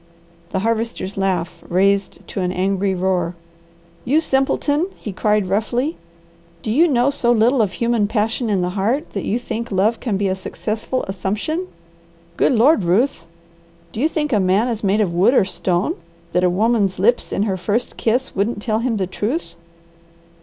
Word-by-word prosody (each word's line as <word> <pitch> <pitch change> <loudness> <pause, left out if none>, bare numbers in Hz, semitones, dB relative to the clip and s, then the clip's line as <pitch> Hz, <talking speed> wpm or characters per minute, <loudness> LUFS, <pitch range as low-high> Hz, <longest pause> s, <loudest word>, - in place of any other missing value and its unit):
The 190 - -2
Harvester's 225 -3 -2
laugh 185 -3 -1
raised 195 +2 +1
to 195 - -3
an 180 0 0
angry 190 +1 0
roar. 180 -2 0 0.7
"You 285 +6 +3
simpleton!" 290 +2 +1
he 210 - -6
cried 210 0 +1
roughly. 240 - 0 0.7
"Do 215 - -2
you 320 +9 +5
know 260 -2 +2
so 240 -3 +1
little 240 +2 +4
of 200 -3 0
human 235 -3 +1
passion 220 +2 -1
in 195 -3 +1
the 180 - -1
heart 220 - -1
that 195 - -4
you 220 - 0
think 235 -1 -5
love 205 +4 +2
can 215 -6 -1
be 200 0 0
a 190 - +1
successful 215 +6 -3
assumption? 210 - -3 0.7
Good - - +3
Lord, 245 - +4
Ruth! 185 +2 +1 0.7
Do 215 - -6
you 305 +5 +2
think 300 -4 -1
a 210 - +4
man 195 +5 +2
is 225 -2 -3
made 200 +2 +2
of 185 -5 0
wood 200 +9 +4
or 200 - +5
stone, 190 - -1 0.4
that 180 - +2
a 180 - +4
woman's 205 +1 +1
lips 230 +6 +2
in 200 - 0
her 200 -3 0
first 210 +6 -2
kiss 245 +4 -1
wouldn't 205 +3 0
tell 215 0 -1
him 230 -1 0
the 190 - 0
truth? 210 - -3
215 Hz, 175 wpm, -20 LUFS, 190-240 Hz, 0.7 s, you